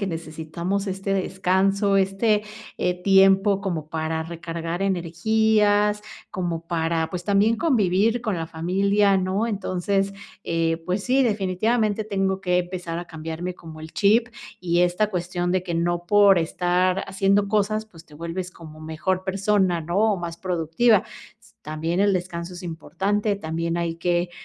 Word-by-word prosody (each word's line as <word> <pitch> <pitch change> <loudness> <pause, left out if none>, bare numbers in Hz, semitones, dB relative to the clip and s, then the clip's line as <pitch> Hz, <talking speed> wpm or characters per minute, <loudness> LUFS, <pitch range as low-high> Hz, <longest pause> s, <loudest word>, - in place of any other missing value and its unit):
que 200 - -1
necesitamos 170 +3 -4
este 195 +1 -3
descanso, 195 +1 +1
este, 200 +2 +2 0.4
eh, 180 0 -1
tiempo 195 +1 +5
como 170 -6 -3
para 160 0 -2
recargar 170 +1 -5
energías, 205 +3 +2 0.3
como 170 -3 -3
para, 165 -1 -1
pues, 180 -1 -5
también 205 +3 +3
convivir 225 - +2
con 210 -6 -1
la 165 -1 -3
familia, 195 +4 +2
¿no?, 190 +4 0
entonces, 195 -1 -1 0.3
eh, 165 -1 0
pues 185 +2 -1
sí, 265 +2 +3
definitivamente 215 +1 0
tengo 195 -2 -1
que 180 -2 +1
empezar 175 -2 -4
a 175 - -6
cambiarme 165 +2 -5
como 160 -2 -11
el 160 0 -10
chip, 225 +4 +3 0.3
y 175 -1 +1
esta 180 +4 +2
cuestión 175 -1 -2
de 185 -1 +1
que 175 -2 -4
no 175 +1 -1
por 200 -1 +6
estar 180 +3 +1
haciendo 195 +1 +2
cosas, 215 +1 +1
pues 165 -5 -16
te 150 - -17
vuelves 170 +3 -5
como 155 -3 -13
mejor 175 +4 -2
persona, 190 -2 +1
¿no?, 175 +5 -1 0.2
o - - -4
más 170 -2 -6
productiva. 185 +5 +2 0.3
S 220 -2 -23
también 160 +4 -2
el 200 0 +4
descanso 175 -1 -4
es 175 - -9
importante, 200 +5 -1
también 165 -1 -3
hay 170 -1 -2
que 175 0 0
185 Hz, 150 wpm, -24 LUFS, 170-200 Hz, 0.4 s, por